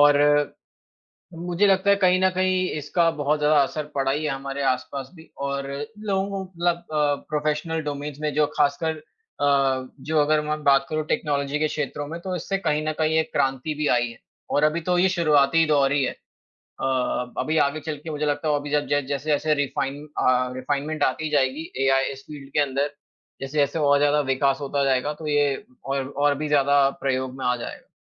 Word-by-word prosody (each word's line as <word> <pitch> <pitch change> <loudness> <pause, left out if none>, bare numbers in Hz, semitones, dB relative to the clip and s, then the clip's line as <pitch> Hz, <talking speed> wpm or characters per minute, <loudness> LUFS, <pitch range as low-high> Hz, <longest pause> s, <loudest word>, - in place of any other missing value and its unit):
और 145 0 +7
अ 145 0 +4 0.9
मुझे 175 +3 +1
लगता 195 +1 +3
है 200 - +6
कहीं 185 -2 +3
न 190 - +5
कहीं 185 0 +1
इसका 165 +3 +1
बहुत 150 +1 +1
ज़्यादा 150 +1 +3
असर 150 +3 -3
पड़ा 135 -1 +1
ही 150 +3 -1
है - - 0
हमारे 135 +1 -4
आसपास 130 +1 -2
भी 160 -1 -15 0.2
और 140 0 -3 0.3
लोगों 195 -2 -1
को 195 -1 -3
मतलब 175 -2 -1
अ, 150 -4 0
प्रोफ़ेशनल 155 +2 -1
डोमेन्स 145 0 -5
में 150 -1 -1
जो 150 +1 +3
खासकर 150 +2 +1
अ, 140 - -1
जो 155 +2 0
अगर 150 +1 +3
मैं 150 0 -2
बात 135 -1 +4
करूँ 155 -1 -2
टेक्नोलॉजी 145 -1 -1
के 155 - +2
क्षेत्रों 145 -1 -4
में 165 +3 -6
तो 185 0 -3
इससे 185 +3 -2
कहीं 150 -6 0
न - - +2
कहीं 160 0 +2
एक 160 - -2
क्रांति 135 +3 0
भी 150 0 -1
आई 120 0 0
है। 115 - -12 0.3
और 145 - +2
अभी 155 +2 +2
तो 180 +2 0
ये 185 +1 +4
शुरुआती 160 -3 +3
दौर 140 -3 +3
ही 145 -1 +2
है। 130 - 0 0.5
अ, 130 -1 -2
अभी 160 +1 0
आगे 140 +2 -2
चलके 155 +1 -6
मुझे 150 0 -2
लगता 150 +2 -1
है 150 - +2
और 145 - 0
भी 145 - -7
ज - - -3 0.2
जब 145 -1 +1
जैसे-जैसे 145 +2 0
रिफ़ाइन 140 0 -2 0.2
अ, 125 0 +2
रिफ़ाइनमेंट 145 +4 -2
आती 155 +4 0
जाएगी 145 +2 0
एआई 135 0 +2
इस 135 0 -10
फील्ड 140 -2 -10
के - - +2
अंदर, 140 0 +1 0.5
जैसे-जैसे 140 +3 0
और 145 -1 +4
ज़्यादा 145 +1 +3
विकास 135 0 +1
होता 140 0 -1
जाएगा 135 +2 +1
तो 155 +1 -8
ये 145 -2 +2 0.3
और, 135 -1 -2
और 145 +1 +1
भी 155 +1 -3
ज़्यादा 140 -1 +4
प्रयोग 130 -1 -1
में 130 - -3
आ 125 - +2
जाएगा। 120 - -8
145 Hz, 200 wpm, -24 LUFS, 140-155 Hz, 0.9 s, और